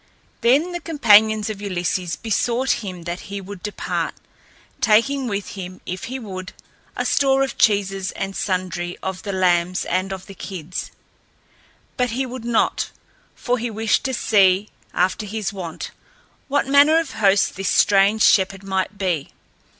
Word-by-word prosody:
Then 280 Hz, +9 st, +3 dB
the 350 Hz, -, -3 dB
companions 220 Hz, -9 st, +4 dB
of 205 Hz, -2 st, -8 dB
Ulysses 180 Hz, -3 st, -2 dB
besought 240 Hz, +3 st, 0 dB
him 180 Hz, -4 st, -6 dB
that 175 Hz, +2 st, -4 dB
he 200 Hz, 0 st, -4 dB
would 195 Hz, -1 st, -9 dB
depart, 210 Hz, +1 st, -3 dB, 0.6 s
taking 250 Hz, +5 st, +3 dB
with 200 Hz, -2 st, -3 dB
him, 185 Hz, -2 st, -8 dB
if 185 Hz, +1 st, -5 dB
he 260 Hz, +2 st, -4 dB
would, 185 Hz, -6 st, -7 dB, 0.4 s
a -, -, -2 dB
store 270 Hz, -1 st, +3 dB
of 270 Hz, -, -3 dB
cheeses 195 Hz, -3 st, +1 dB
and 195 Hz, 0 st, -4 dB
sundry 180 Hz, -2 st, -2 dB
of 190 Hz, -1 st, -4 dB
the 200 Hz, -, -4 dB
lambs 180 Hz, -1 st, +1 dB
and 185 Hz, +1 st, -1 dB
of 190 Hz, -1 st, -6 dB
the 195 Hz, -, -11 dB
kids. 180 Hz, -3 st, -6 dB, 1.1 s
But 250 Hz, -1 st, +1 dB
he 255 Hz, +4 st, -1 dB
would 250 Hz, -2 st, -7 dB
not, 235 Hz, -1 st, +1 dB, 0.5 s
for 250 Hz, 0 st, -1 dB
he 240 Hz, +1 st, -2 dB
wished 220 Hz, 0 st, +1 dB
to 265 Hz, -, -1 dB
see, 200 Hz, -2 st, +3 dB, 0.2 s
after 185 Hz, +4 st, 0 dB
his 210 Hz, -1 st, -3 dB
wont, 175 Hz, -5 st, -6 dB, 0.6 s
what 285 Hz, 0 st, +1 dB
manner 285 Hz, +3 st, +5 dB
of 325 Hz, -4 st, -1 dB
host 200 Hz, -2 st, +2 dB
this 195 Hz, -1 st, -2 dB
strange 205 Hz, +2 st, +4 dB
shepherd 195 Hz, 0 st, +3 dB
might 190 Hz, +1 st, -2 dB
be. 180 Hz, -7 st, -1 dB
200 Hz, 155 wpm, -21 LUFS, 185-235 Hz, 1.1 s, manner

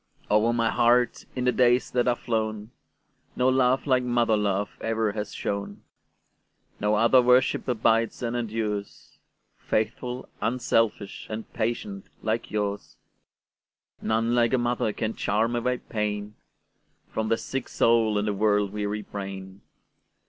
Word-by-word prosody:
Over 105 Hz, +2 st, +4 dB
my 115 Hz, -1 st, +1 dB
heart, 120 Hz, 0 st, +2 dB
in 125 Hz, -, -2 dB
the 125 Hz, -, +3 dB
days 125 Hz, 0 st, +3 dB
that 125 Hz, 0 st, +1 dB
are 120 Hz, -, +3 dB
flown, 110 Hz, -2 st, -3 dB, 0.6 s
No 125 Hz, +1 st, +3 dB
love 130 Hz, 0 st, +2 dB
like 130 Hz, -3 st, +3 dB
mother 120 Hz, -2 st, +2 dB
love 100 Hz, -1 st, 0 dB
ever 110 Hz, -1 st, 0 dB
has 105 Hz, 0 st, -5 dB
shone; 100 Hz, 0 st, -4 dB, 1.0 s
No 105 Hz, +1 st, +2 dB
other 115 Hz, +4 st, +5 dB
worship 125 Hz, +1 st, +3 dB
abides 115 Hz, -1 st, +1 dB
and 120 Hz, 0 st, -2 dB
endures,—Faithful, 110 Hz, +2 st, -4 dB
unselfish, 115 Hz, -3 st, 0 dB
and 110 Hz, 0 st, -6 dB
patient 105 Hz, -3 st, -3 dB, 0.2 s
like 110 Hz, +2 st, -1 dB
yours:None 110 Hz, +2 st, -5 dB
like 120 Hz, 0 st, +3 dB
a -, -, +4 dB
mother 120 Hz, -2 st, 0 dB
can 110 Hz, +1 st, -3 dB
charm 115 Hz, +3 st, 0 dB
away 125 Hz, +1 st, 0 dB
painFrom 105 Hz, 0 st, -6 dB
the 115 Hz, -, +2 dB
sick 135 Hz, +1 st, -4 dB
soul 115 Hz, -2 st, +3 dB
and 105 Hz, +1 st, 0 dB
the 105 Hz, -, +1 dB
world 105 Hz, -1 st, +1 dB
weary 105 Hz, 0 st, -3 dB
brain. 95 Hz, -1 st, -7 dB
110 Hz, 125 wpm, -26 LUFS, 105-120 Hz, 1.0 s, other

